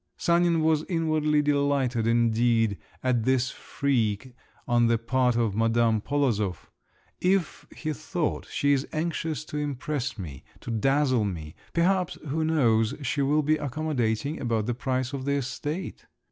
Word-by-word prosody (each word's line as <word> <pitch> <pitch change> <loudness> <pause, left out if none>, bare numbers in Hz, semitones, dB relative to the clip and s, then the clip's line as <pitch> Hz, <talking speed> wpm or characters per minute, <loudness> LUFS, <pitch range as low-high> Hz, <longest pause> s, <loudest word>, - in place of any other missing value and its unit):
Sanin 170 -1 +2
was 155 -1 +2
inwardly 155 -3 +1
delighted 140 -5 +1
indeed 115 -2 +2 0.2
at 125 -3 +1
this 130 0 +1
freak 125 -3 -1 0.3
on 120 -1 +3
the 115 0 +3
part 125 +1 +1
of 115 -4 +1
Madame 115 0 +2
Polozov; 110 - -1 0.5
if, 185 -2 0
he 155 -1 -4
thought, 160 +2 -3
she 145 0 +2
is 135 0 0
anxious 160 -2 -2
to 150 - -6
impress 145 -3 -3
me, 80 -9 -7 0.2
to 120 - -6
dazzle 130 +1 +2
me, 80 -6 -4 0.2
perhaps, 180 +1 +2
who 160 +3 0
knows, 120 -7 +2
she 140 +2 0
will 150 +2 +2
be 155 +2 +2
accommodating 145 -2 -2
about 115 -4 0
the 120 - -1
price 130 +1 -2
of 135 -1 -4
the 140 - +1
estate. 145 +5 -4
135 Hz, 145 wpm, -27 LUFS, 115-155 Hz, 0.5 s, on